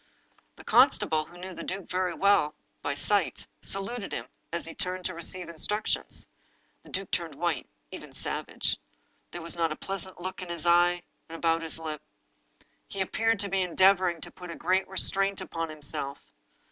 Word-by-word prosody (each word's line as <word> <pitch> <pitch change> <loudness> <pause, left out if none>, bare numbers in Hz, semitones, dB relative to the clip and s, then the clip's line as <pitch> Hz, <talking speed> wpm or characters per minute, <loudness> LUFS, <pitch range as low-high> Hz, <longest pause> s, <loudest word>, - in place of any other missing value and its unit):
The - - -13
constable, 155 -1 +5
who 175 - -14
knew 185 +1 -6
the - - -7
duke 190 0 -4
very 180 -1 0
well 200 -7 +4 0.3
by 145 - -1
sight, 200 +5 +1 0.2
saluted 200 +3 -2
him - - -3 0.3
as 170 0 -1
he 165 - -6
turned 185 -1 -2
to 185 - +1
receive 175 +1 -2
instructions. 190 +6 -1 0.6
The - - -16
duke 195 0 0
looked 165 -4 -7
white, 170 +1 -1 0.2
even - - -8
savage. - - -1 0.5
There 175 - -7
was 170 - -1
not 165 -2 +1
a - - -1
pleasant 190 0 -5
look 185 +1 -4
in 180 - -6
his 170 -2 -2
eyes 175 +1 +5 0.3
and 165 - -6
about 165 0 +2
his 165 -1 -3
lips. 155 -2 -5 0.8
He 195 - -6
appeared 225 +3 +2
to 200 - +3
be 195 0 +2
endeavoring 185 -1 +4
to - - -5
put 180 -1 -10
a 170 - -5
g^eat 190 +1 +2
restraint 195 +1 +3
upon 165 -1 -3
himself. 145 -2 -3
175 Hz, 175 wpm, -29 LUFS, 165-190 Hz, 0.8 s, constable